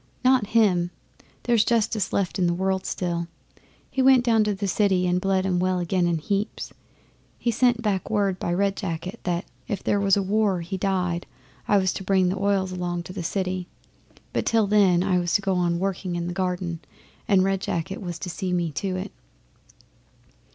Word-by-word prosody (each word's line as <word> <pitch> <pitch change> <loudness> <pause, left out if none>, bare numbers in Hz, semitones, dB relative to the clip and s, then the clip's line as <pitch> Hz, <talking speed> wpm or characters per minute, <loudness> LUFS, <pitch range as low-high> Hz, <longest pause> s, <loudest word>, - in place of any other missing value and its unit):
'Not 255 -5 +4
him! 180 -6 +3 0.5
There's 235 -3 +3
justice 220 -3 +1
left 195 -1 -1
in 180 - +3
the 170 - +1
world 190 +1 -1
still. 170 -2 -2 0.6
He 265 - 0
went 260 -1 +6
down 225 -2 +4
to 210 -1 0
the 200 +1 -3
City 190 -1 +2
and 180 0 +1
bled 190 -1 +1
'em 180 -2 +1
well 185 0 +1
again 175 0 +1
in 170 -1 +1
heaps. 200 +6 -3 0.6
He 235 - 0
sent 240 0 +2
back 200 -4 -1
word 200 -4 0
by - - -2
Red 195 +2 +1
Jacket 180 -2 -5
that, 175 0 -1 0.2
if 205 -6 -3
there 205 - +1
was 195 0 +3
war 200 0 +1
or - - -4
he 170 +3 -5
died, 180 -3 -1 0.4
I 205 - +4
was 190 -2 +1
to - - -5
bring 190 -1 +2
the 185 - -2
oils 195 -1 +1
along 175 -1 -3
to 185 - -9
the 190 - -4
City, 185 +1 -2 0.7
but - - -1
till 225 -2 +3
then 195 -4 +4
I 185 -2 +2
was 175 0 0
to - - +3
go 195 -1 +1
on 175 -1 +1
working 185 -1 -2
in 170 0 -2
the 175 - -3
garden 180 -2 -2 0.5
and 195 -3 +4
Red 195 0 0
Jacket 190 +4 -3
was 175 -3 -5
to 185 - -4
see 180 +1 -3
me 170 -2 0
do 185 +5 -3
it. 185 +2 -5
190 Hz, 200 wpm, -24 LUFS, 180-200 Hz, 0.7 s, went